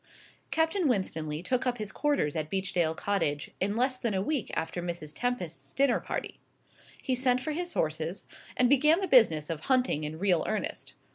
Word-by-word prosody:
Captain 320 +2 +1
Winstanley 160 - -1
took 255 +6 0
up 245 -1 0
his 215 -2 -4
quarters 285 - 0
at 155 -1 -2
Beechdale 185 -4 0
Cottage 165 -8 -1
in 200 +2 0
less 255 +2 +1
than 225 -4 -1
a 190 - +1
week 285 0 -1
after 170 +2 -2
Mrs. 170 -3 -5
Tempest's 240 -10 -3
dinner 270 -3 +3
party. - - -5 0.6
He 260 - -1
sent 255 0 +2
for 310 +5 -3
his 350 +3 -3
horses, 160 +4 -2 0.3
and 250 - +5
began 300 +7 +4
the 385 - -1
business 165 - +5
of 160 -1 -5
hunting 255 - +2
in 150 +1 -4
real 180 -2 +2
earnest. 215 -1 -3
205 Hz, 180 wpm, -29 LUFS, 165-260 Hz, 0.6 s, and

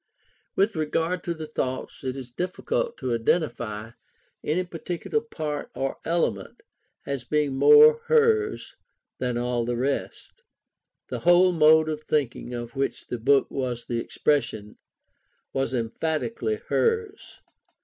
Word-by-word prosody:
With 200 +2 +2
regard 165 +3 -1
to 170 - -2
the 160 -1 -6
thoughts, 130 -4 -4
it 130 0 -3
is 125 -2 -8
difficult 460 - -2
to 125 - -2
identify 115 -4 -1 0.5
any 165 +5 0
particular 175 +5 -3
part 155 -10 -5
or 135 0 -2
element 170 0 -1 0.4
as 140 -3 -3
being 150 +1 0
more 450 - +7
hers 445 -2 +2 0.5
than 125 -2 -1
all 120 0 0
the 120 0 -2
rest. 135 +3 -3 0.8
The - - -3
whole 175 +1 +5
mode 160 -1 +5
of 155 -1 -3
thinking 140 -5 -1
of 120 -1 -6
which 135 0 -2
the 120 - -5
book 135 +4 +3
was 125 -3 -3
the 120 -1 -2
expression, 115 -6 -1 0.7
was 135 -2 0
emphatically 160 - -2
hers. 450 -2 -1
150 Hz, 130 wpm, -25 LUFS, 125-180 Hz, 0.8 s, more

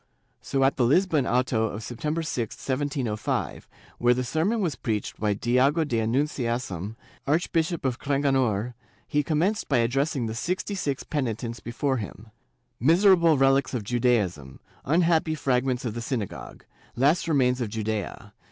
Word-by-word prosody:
So 135 -1 0
at 135 - +2
the 125 - +3
Lisbon 155 +2 +3
auto 120 -2 +1
of 110 0 -5
September 150 +8 -3
6, 120 -8 -3
1705, 130 -5 -2 0.3
where 120 0 +4
the 125 - -1
sermon 165 - 0
was 170 -9 -1
preached 105 -3 -3
by 105 -1 +1
Diogo 130 +9 +2
da 120 -7 -1
Annunciasam, 115 - -1 0.3
Archbishop 165 +1 0
of 130 -2 -1
Cranganor, 130 -6 +1 0.3
he 150 - +1
commenced 170 +8 0
by 140 - +3
addressing 135 +2 +1
the 110 - -3
sixty 180 - -2
six 145 -8 -2
penitents 115 -5 -3
before 130 +5 -1
him 110 0 -8
— - - -45
' 120 - -46
' - - -47
Miserable 170 - +5
relics 135 0 +3
of 115 - -2
Judaism! 105 - 0 0.3
Unhappy 160 +1 +2
fragments 130 -2 0
of 115 - -2
the 120 - -5
synagogue! 105 - -5 0.3
Last 145 +8 +2
remains 130 -5 +2
of 115 - -1
Judea! 110 -2 -4
130 Hz, 150 wpm, -26 LUFS, 115-150 Hz, 0.3 s, Miserable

